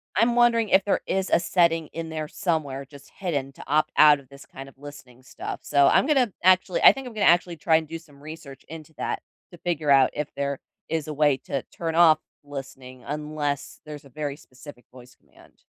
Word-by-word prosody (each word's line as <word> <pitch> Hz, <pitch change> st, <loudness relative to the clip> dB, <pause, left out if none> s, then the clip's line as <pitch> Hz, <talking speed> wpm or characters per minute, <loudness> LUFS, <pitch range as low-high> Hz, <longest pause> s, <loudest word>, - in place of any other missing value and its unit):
I'm 235 Hz, +3 st, +2 dB
wondering 235 Hz, -2 st, +3 dB
if 190 Hz, 0 st, +4 dB
there 200 Hz, -, +1 dB
is 190 Hz, 0 st, -1 dB
a -, -, +5 dB
setting 165 Hz, -2 st, +1 dB
in 165 Hz, 0 st, -7 dB
there 155 Hz, -1 st, -4 dB
somewhere 145 Hz, -5 st, -3 dB
just 140 Hz, 0 st, -16 dB
hidden 145 Hz, -8 st, -3 dB
to -, -, -12 dB
opt 155 Hz, +1 st, +1 dB
out 150 Hz, -1 st, +7 dB
of 135 Hz, -, -19 dB
this 140 Hz, 0 st, -14 dB
kind 135 Hz, +1 st, -11 dB
of 135 Hz, -, -22 dB
listening 135 Hz, -3 st, -13 dB
stuff, -, -, -7 dB
so 140 Hz, -1 st, +3 dB
I'm -, -, +4 dB
gonna 265 Hz, -7 st, +2 dB
actually 185 Hz, 0 st, +3 dB
I -, -, +10 dB
think 270 Hz, -1 st, -8 dB
I'm 245 Hz, -, -9 dB
gonna 210 Hz, -2 st, 0 dB
actually 175 Hz, 0 st, +3 dB
try 160 Hz, +2 st, +2 dB
and 160 Hz, -1 st, +1 dB
do 165 Hz, +1 st, -7 dB
some 145 Hz, -4 st, -20 dB
research 150 Hz, -3 st, -11 dB
into 160 Hz, 0 st, -10 dB
that -, -, -3 dB, 0.3 s
to 175 Hz, -, -13 dB
figure 160 Hz, -4 st, -1 dB
out 135 Hz, -2 st, +6 dB
if 150 Hz, -1 st, -5 dB
there 140 Hz, -1 st, -3 dB, 0.3 s
is 160 Hz, -2 st, -2 dB
a 155 Hz, -, -4 dB
way 145 Hz, -2 st, +2 dB
to 135 Hz, -2 st, -3 dB
turn 165 Hz, -1 st, -3 dB
off 165 Hz, -2 st, +6 dB, 0.2 s
listening 135 Hz, -3 st, -10 dB
unless 150 Hz, -1 st, -4 dB
there's 150 Hz, -1 st, -10 dB
a 140 Hz, -, -15 dB
very 145 Hz, +1 st, -5 dB
specific 130 Hz, -2 st, -15 dB
voice 125 Hz, -1 st, -16 dB
command. -, -, -24 dB
150 Hz, 215 wpm, -24 LUFS, 140-170 Hz, 0.3 s, I